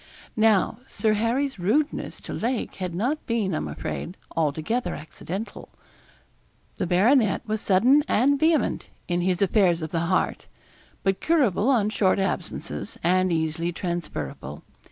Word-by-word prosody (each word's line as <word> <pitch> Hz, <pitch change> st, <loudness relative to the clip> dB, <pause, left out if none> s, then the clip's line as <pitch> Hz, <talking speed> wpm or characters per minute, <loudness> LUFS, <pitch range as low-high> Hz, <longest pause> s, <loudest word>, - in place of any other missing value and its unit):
Now, 220 Hz, 0 st, +3 dB
Sir 220 Hz, -1 st, +1 dB
Harry's 235 Hz, +3 st, 0 dB
rudeness 255 Hz, +12 st, 0 dB
to -, -, -7 dB
Lake 240 Hz, +1 st, -2 dB
had 180 Hz, -3 st, -4 dB
not 255 Hz, -, -1 dB
been, 220 Hz, -6 st, 0 dB
I -, -, 0 dB
am -, -, -3 dB
afraid, 180 Hz, -, -5 dB, 0.2 s
altogether 160 Hz, -, -1 dB
accidental. 185 Hz, +7 st, -7 dB, 1.1 s
The 185 Hz, -, -1 dB
baronet 215 Hz, +5 st, +3 dB
was 215 Hz, 0 st, -1 dB
sudden 245 Hz, +10 st, +4 dB
and 275 Hz, +5 st, +3 dB
vehement 320 Hz, 0 st, +1 dB, 0.2 s
in 175 Hz, 0 st, 0 dB
his 185 Hz, +1 st, +1 dB
affairs 180 Hz, -4 st, +3 dB
of 160 Hz, -, -5 dB
the 165 Hz, -, 0 dB
heart; 185 Hz, -, 0 dB, 0.6 s
but 195 Hz, -1 st, 0 dB
curable 260 Hz, -, +2 dB
on 225 Hz, -6 st, +3 dB
short 190 Hz, -3 st, +2 dB
absences, 190 Hz, 0 st, -3 dB
and 185 Hz, +2 st, +3 dB
easily 160 Hz, +1 st, -1 dB
transferable. 170 Hz, -, -5 dB
195 Hz, 135 wpm, -25 LUFS, 175-235 Hz, 1.1 s, sudden